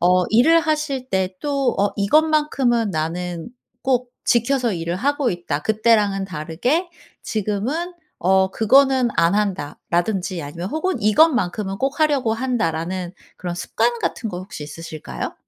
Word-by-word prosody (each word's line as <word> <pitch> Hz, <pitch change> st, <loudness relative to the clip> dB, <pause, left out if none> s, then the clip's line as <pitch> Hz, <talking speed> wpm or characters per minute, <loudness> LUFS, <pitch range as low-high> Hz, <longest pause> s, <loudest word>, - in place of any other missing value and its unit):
어 180 Hz, +1 st, +4 dB
일을 320 Hz, +9 st, +5 dB
하실 300 Hz, -5 st, -2 dB
때 190 Hz, -1 st, 0 dB
또 280 Hz, -3 st, 0 dB
어 200 Hz, 0 st, +2 dB
"이것만큼은 265 Hz, -2 st, +2 dB
나는 170 Hz, +2 st, -3 dB, 0.3 s
꼭 250 Hz, -2 st, 0 dB
지켜서 240 Hz, -1 st, +2 dB
일을 170 Hz, 0 st, -3 dB
하고 285 Hz, +3 st, 0 dB
있다.", 175 Hz, -4 st, -3 dB
"그때랑은 215 Hz, -3 st, +2 dB
다르게 190 Hz, -, -1 dB, 0.3 s
지금은 230 Hz, -, -2 dB, 0.3 s
어 190 Hz, +1 st, +3 dB
그거는 260 Hz, +3 st, +4 dB
안 165 Hz, +3 st, +3 dB
한다."라든지 185 Hz, 0 st, -1 dB
아니면 170 Hz, +6 st, -6 dB
혹은 315 Hz, -, -2 dB
"이것만큼은 210 Hz, -, +2 dB
꼭 270 Hz, +4 st, -1 dB
하려고 280 Hz, -7 st, +2 dB
한다."라는 185 Hz, -7 st, -2 dB, 0.2 s
그런 175 Hz, -1 st, -5 dB
습관 235 Hz, +6 st, 0 dB
같은 225 Hz, -, -2 dB
거 180 Hz, -4 st, -5 dB
혹시 185 Hz, -4 st, -8 dB
있으실까요? 155 Hz, +1 st, -7 dB
215 Hz, 300 characters per minute, -21 LUFS, 180-265 Hz, 0.3 s, 일을